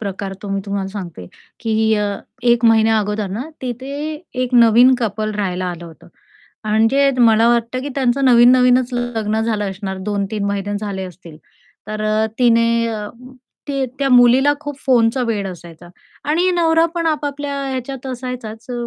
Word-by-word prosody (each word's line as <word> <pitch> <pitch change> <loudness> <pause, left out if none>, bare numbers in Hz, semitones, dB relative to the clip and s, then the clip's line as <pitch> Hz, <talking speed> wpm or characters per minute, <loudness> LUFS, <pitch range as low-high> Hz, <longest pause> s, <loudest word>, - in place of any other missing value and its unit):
प्रकार 195 -1 -5
तो 205 - -6
मी 195 0 -1
तुम्हाला 200 -1 -3
सांगते, 180 - -8 0.3
की 220 -1 +1
अ, 210 -1 0 0.4
1 240 -1 +3
महिन्या 225 -1 +4
अगोदर 210 0 -2
ना 215 +5 -3 0.2
तिथे 255 +2 -5 0.5
एक 255 0 -2
नवीन 240 +2 +6
कपल 215 -2 -2
राहायला 185 -3 -2
आलं 175 -1 -6
होतं 165 -2 -14 0.6
आणि 225 +6 +3
मला 230 -1 +5
वाटतं, 235 +1 0
की 285 - -5
त्यांचं 270 0 +1
नवीन-नवीनच 250 0 +5
लग्न 225 -3 -2
झालं 215 -3 -1
असणार. 190 0 -6
2-3 200 +1 -3
महिने 200 0 -2
झाले 200 -3 -4
असतील. 175 -3 -12 0.5
तर 215 0 -5
अ, 215 +1 +1
तिने 230 -1 +3
अ, 215 -2 -4 0.6
ते 275 -1 -1
त्या 275 -1 +1
मुलीला 250 +3 +5
खूप 290 -2 -6
फोनचं 245 -1 +2
वेड 210 -3 -2
असायचा 175 -1 -11 0.4
आणि 350 +4 +2
नवरा 325 -1 +3
पण 335 -1 -1
आपापल्या 290 -2 -2 0.2
ह्याच्यात 260 0 -5
असायचाच 250 -3 -6
अ, 240 -1 -4
225 Hz, 155 wpm, -18 LUFS, 205-255 Hz, 0.6 s, नवीन